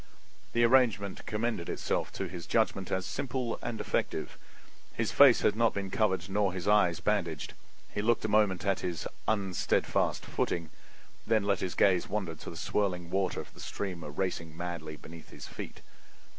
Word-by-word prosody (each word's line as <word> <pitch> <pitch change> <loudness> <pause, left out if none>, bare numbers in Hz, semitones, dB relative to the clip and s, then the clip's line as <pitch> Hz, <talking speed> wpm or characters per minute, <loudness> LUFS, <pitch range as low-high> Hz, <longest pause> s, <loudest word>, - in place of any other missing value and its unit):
The 120 - +3
arrangement 115 -5 +3
commended 105 -5 -1
itself - - -1
to 95 - -3
his 85 -2 -8
judgement 105 -4 +1
as 95 -1 0
simple 125 -3 -2
and 120 -2 -4
effective. - - -1 0.6
His - - 0
face - - +7
had 105 - +3
not 115 0 +2
been 100 -2 -3
covered 95 -5 +1
nor 100 -1 +1
his 90 -1 -4
eyes 105 -5 +4
bandaged. 85 -9 -1 0.4
He 105 - -1
looked 115 +1 +2
a - - +2
moment 105 -3 +3
at 100 -1 +2
his 85 -2 -3 0.2
"unsteadfast 100 -4 +1
footing," 85 -3 -2 0.6
then 110 -2 +3
let 100 -1 +1
his 95 -2 -3
gaze 95 -3 +3
wander 95 -6 -2
to 80 - -9
the 85 - -8
swirling 90 0 -1
water 95 -1 0
of - - -14
the - - -16
stream 90 -5 -4
racing 80 +1 -3
madly 85 -3 -5
beneath 85 +1 -12
his - - -9
feet. - - -8
95 Hz, 170 wpm, -31 LUFS, 85-105 Hz, 0.6 s, face